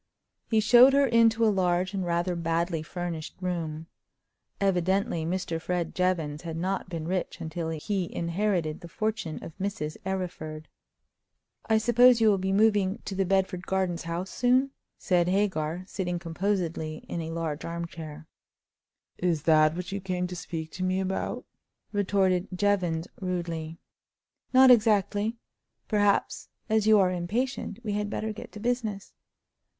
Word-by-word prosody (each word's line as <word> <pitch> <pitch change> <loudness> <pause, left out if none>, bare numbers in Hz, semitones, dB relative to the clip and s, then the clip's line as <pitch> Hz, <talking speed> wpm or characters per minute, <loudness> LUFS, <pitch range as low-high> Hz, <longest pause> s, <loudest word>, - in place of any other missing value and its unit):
He 220 - +3
showed 245 +5 +7
her 280 0 +5
into 230 -2 +4
a 215 - +4
large 180 0 +1
and 195 -1 -1
rather 175 +1 0
badly 165 0 -1
furnished 170 -1 -5
room. 165 -4 -3 0.7
Evidently 190 -3 +1
Mr. 170 -2 -2
Fred 175 -1 -2
Jevons 165 -5 0
had 165 -2 -5
not 185 +2 -2
been 165 -3 -4
rich 185 0 -2
until 160 0 -4
he 175 +3 -2
inherited 170 -2 -1
the 170 - -9
fortune 215 -4 -3
of 165 - -9
Mrs. 185 -6 -3
Arryford. 175 -5 -4 1.0
"I 220 - +4
suppose 240 +2 +5
you 220 -1 +5
will 200 -2 +3
be 190 +1 -1
moving 205 -1 +3
to 200 - -4
the 190 -1 0
Bedford 190 -1 0
Gardens 185 -3 0
house 170 +3 -4
soon?" 255 +2 +2 0.3
said 175 -3 +2
Hagar, 180 -3 0
sitting 180 -2 -3
composedly 170 -2 -2
in 170 - -3
a 160 - -5
large 165 -2 -3
armchair. 165 -2 -6 0.9
"Is 170 -4 0
that 155 -1 +4
what 180 +1 -5
you 200 0 -3
came 180 -1 -2
to 180 0 -5
speak 160 -2 -6
to 185 - -5
me 185 +1 +1
about?" 190 0 -3 0.5
retorted 195 -2 +1
Jevons, 180 -4 +1
rudely. 170 -3 -3 0.7
"Not 260 0 +8
exactly. 215 -1 +3 0.5
Perhaps, 205 -2 +1 0.2
as 220 -1 +2
you 215 -1 +7
are 185 -2 +4
impatient, 205 +7 -2
we 210 -2 -2
had 205 0 -1
better 220 +1 -3
get 215 - -10
to 210 - -8
business." 225 -4 -2
185 Hz, 145 wpm, -27 LUFS, 170-205 Hz, 1.0 s, Not